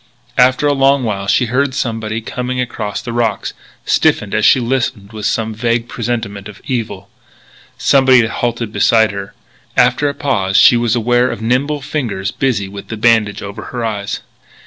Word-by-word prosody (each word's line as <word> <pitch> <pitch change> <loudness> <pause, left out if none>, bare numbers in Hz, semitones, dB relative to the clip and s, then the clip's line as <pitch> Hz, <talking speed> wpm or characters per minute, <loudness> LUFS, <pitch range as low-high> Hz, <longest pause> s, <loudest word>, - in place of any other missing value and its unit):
After 130 +3 +4
a 145 - +3
long 135 0 +3
while 100 -4 -3
she 125 +5 +3
heard 130 +3 0
somebody 115 -4 -2
coming 125 +2 -4
across 110 -4 -3
the 120 - -5
rocks, 115 -3 -1 0.3
stiffened 100 -2 +1
as 110 +1 +3
she - - +5
listened 120 -4 -2
with 105 -1 -3
some 110 +1 -1
vague 115 +1 -1
presentiment 110 -5 -4
of 105 -1 -12
evil. 105 -7 -4 0.7
Somebody 130 -2 +5
had 115 0 -1
halted 115 -2 -2
beside 110 -2 +3
her. 100 -1 -7 0.4
After 125 +4 +3
a 140 - -5
pause 100 -9 0
she - - +7
was 120 0 +1
aware 120 +2 +2
of - - -5
nimble 140 +5 0
fingers 115 -10 -3
busy 115 -8 -1
with 100 0 -9
the 115 - -6
bandage 110 -2 +2
over 100 +1 -7
her 120 -2 -4
eyes. 100 -3 -3
115 Hz, 170 wpm, -16 LUFS, 105-125 Hz, 0.7 s, she